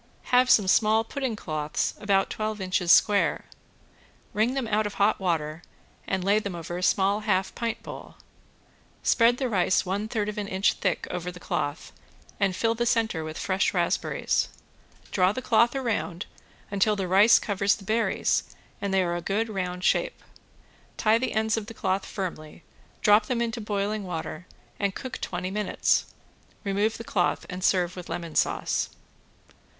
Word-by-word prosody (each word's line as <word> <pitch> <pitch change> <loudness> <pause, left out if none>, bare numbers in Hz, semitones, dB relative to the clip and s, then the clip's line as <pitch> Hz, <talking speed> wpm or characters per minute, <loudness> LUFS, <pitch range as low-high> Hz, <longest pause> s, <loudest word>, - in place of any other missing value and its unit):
Have 250 0 +5
some 205 -6 +5
small 220 +3 +4
pudding 260 0 -3
cloths 155 -5 -2
about 195 -2 +1
twelve 215 0 -3
inches 185 -2 +1
square, 205 +1 +4 0.9
wring 225 +5 +1
them 265 -4 -1
out 215 0 +1
of 205 - -8
hot 205 +2 +2
water 160 -4 -1 0.5
and 190 -2 -1
lay 200 +3 +3
them 200 -4 -5
over 170 +1 -6
a 180 - -4
small 195 +2 +2
half 190 -3 0
pint 230 -1 -3
bowl. - - -9 0.9
Spread 235 0 +4
the 260 - -1
rice 185 -4 +2
one 200 +3 -2
third 220 -2 -2
of 210 0 -3
an 205 - -3
inch 190 +1 +2
thick 185 -3 -1
over 180 0 -4
the 180 - -12
cloth, 145 -3 -3 0.5
and 195 -3 +1
fill 225 +3 +1
the 240 +1 -1
center 220 -9 +1
with 155 0 -6
fresh 190 0 0
raspberries. - - 0 0.6
Draw 185 0 +3
the 255 - -3
cloth 235 +1 +3
around 220 -8 -2 0.5
until 205 +1 +2
the 195 -2 -2
rice 195 +5 +6
covers 200 0 +1
the 200 - -13
berries 225 +3 0 0.3
and 200 -1 -2
they 190 -1 +3
are 175 -1 -1
a 175 - -3
good 210 +6 -1
round 180 -3 -3
shape. - - +1 0.7
Tie 220 +1 +3
the 255 - -2
ends 220 +1 +1
of 215 -2 -4
the 225 - -9
cloth 190 0 -1
firmly, 170 -4 -6 0.4
drop 210 +1 +5
them 250 -2 -1
into 235 0 -2
boiling 205 0 -2
water 180 -1 -5 0.3
and 200 -1 0
cook 260 - -6
twenty 180 +1 -3
minutes. 210 +1 +1 0.6
Remove 205 +2 0
the 230 - -7
cloth 185 -6 0
and 180 0 -6
serve 180 -2 +2
with 180 -2 -8
lemon 165 -1 -5
sauce. - - 0
200 Hz, 170 wpm, -26 LUFS, 180-220 Hz, 0.9 s, rice